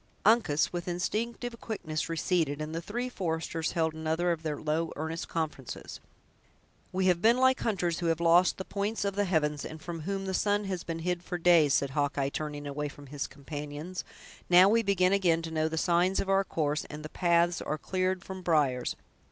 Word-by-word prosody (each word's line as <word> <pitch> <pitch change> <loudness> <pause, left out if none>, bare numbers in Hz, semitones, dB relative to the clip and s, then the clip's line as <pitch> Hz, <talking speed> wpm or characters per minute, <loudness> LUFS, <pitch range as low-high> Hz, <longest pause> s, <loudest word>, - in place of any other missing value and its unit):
Uncas, 210 -11 +3
with 175 0 -4
instinctive 230 +7 -3
quickness, 160 -8 -3
receded, 165 -3 0
and 155 +1 -4
the 165 - -3
three 240 +7 -3
foresters 165 -6 -2
held 160 -2 +1
another 160 +2 0
of 165 -2 -2
their 155 -3 -3
low, 155 +2 -1
earnest 160 +2 -4
conferences. 150 -6 -4 0.9
"We 185 0 0
have 180 -2 +3
been 230 +3 +5
like 260 0 +4
hunters 175 -6 0
who 170 - -1
have 165 -1 +1
lost 170 +2 +4
the 190 - -5
points 205 +1 -2
of 200 -1 -1
the 205 0 +1
heavens, 150 -5 0
and 160 - -7
from 170 +1 -6
whom 195 +4 -3
the 190 - -2
sun 205 +2 +1
has 185 -3 -3
been 165 -1 -4
hid 180 -1 0
for 175 0 -4
days," 165 -5 +5
said 140 -1 +1
Hawkeye, 140 -1 0
turning 145 0 -5
away 145 +1 -3
from 145 0 -13
his 145 - -2
companions; 150 +4 -6 0.5
"now 180 +2 +8
we 230 +3 +4
begin 195 -3 +2
again 170 -4 +2
to 165 - -5
know 155 0 +1
the 160 - -4
signs 175 +3 +2
of 195 - -2
our 195 0 +4
course, 150 -5 -1
and 150 0 -8
the - - -6
paths 170 0 +2
are 155 - -2
cleared 185 +3 -1
from 190 -1 -7
briers! 145 -8 +1
170 Hz, 200 wpm, -29 LUFS, 155-190 Hz, 0.9 s, now